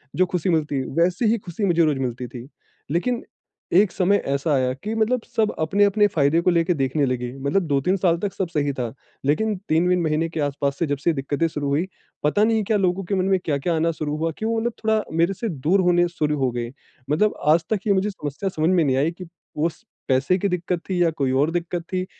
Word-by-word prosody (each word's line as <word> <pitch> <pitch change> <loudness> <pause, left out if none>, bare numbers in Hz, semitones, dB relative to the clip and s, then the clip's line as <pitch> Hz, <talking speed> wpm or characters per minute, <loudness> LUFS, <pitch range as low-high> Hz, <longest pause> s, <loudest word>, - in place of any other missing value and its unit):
जो 185 - +4
खुशी 180 0 -2
मिलती 155 -4 +1
है, 130 - -3
वैसे 175 - +1
ही 225 +2 +3
खुशी 195 0 -4
मुझे 170 -3 +3
रोज़ 150 -4 +1
मिलती 125 -1 -3
थी। 120 +1 -9 0.4
लेकिन 235 +9 0 0.5
एक 190 +2 +5
समय 195 +2 +2
ऐसा 140 +3 0
आया 130 -2 +1
कि 205 +12 -5
मतलब 225 +3 +1
सब 220 -1 +2
अपने-अपने 200 +5 +3
फ़ायदे 160 -3 +2
को 175 - +2
लेके 170 +1 +2
देखने 140 0 0
लगे। 125 -1 -2
मतलब 140 +8 +1
2-3 145 +6 +1
साल 175 -2 +2
तक 195 +2 -3
सब 190 - -2
सही 145 -3 0
था। 120 -4 -4 0.3
लेकिन 210 +10 +1
3 160 +3 +3
वीन 180 0 +2
महीने 160 0 0
के 165 - -5
आस-पास 140 -1 -1
से 170 - +2
जब 145 0 -1
से 165 +5 +1
दिक्कतें 145 +3 -1
शुरू 150 -3 -4
हुईं 145 +5 +1 0.4
पता 150 +8 +3
नहीं 220 0 +2
क्या 210 +2 +1
लोगों 190 0 0
के 195 +3 -2
मन 185 -1 +1
में 190 -1 +2
क्या-क्या 155 +2 0
आना 165 +1 +1
शुरू 150 -2 -3
हुआ 165 +1 -1
कि 220 - -4
वो 225 0 +1
मतलब 235 +1 -1
थोड़ा 220 0 +2 0.2
मेरे 170 +4 +3
से 210 +4 -4
दूर 165 +4 +1
होने 175 -1 +3
शुरू 150 -3 -1
हो 130 -2 +1
गए। 120 0 -4 0.4
मतलब 210 +9 +2
आज 160 +2 +5
तक 215 -2 -1
ये 200 - +4
मुझे 195 +2 +1
समस्या 185 0 -4
समझ 160 -2 0
में 180 -3 +3
नहीं 135 -3 +1
आई 150 +5 +2
कि 180 +2 -10 0.3
उस 160 +2 -2 0.2
पैसे 135 +7 +2
की 200 - 0
दिक्कत 180 -1 -2
थी 180 -2 0
या 170 - +3
कोई 135 -2 +1
और 140 +5 +2
दिक्कत 175 0 -2
थी 185 0 0
170 Hz, 235 wpm, -23 LUFS, 145-190 Hz, 0.5 s, एक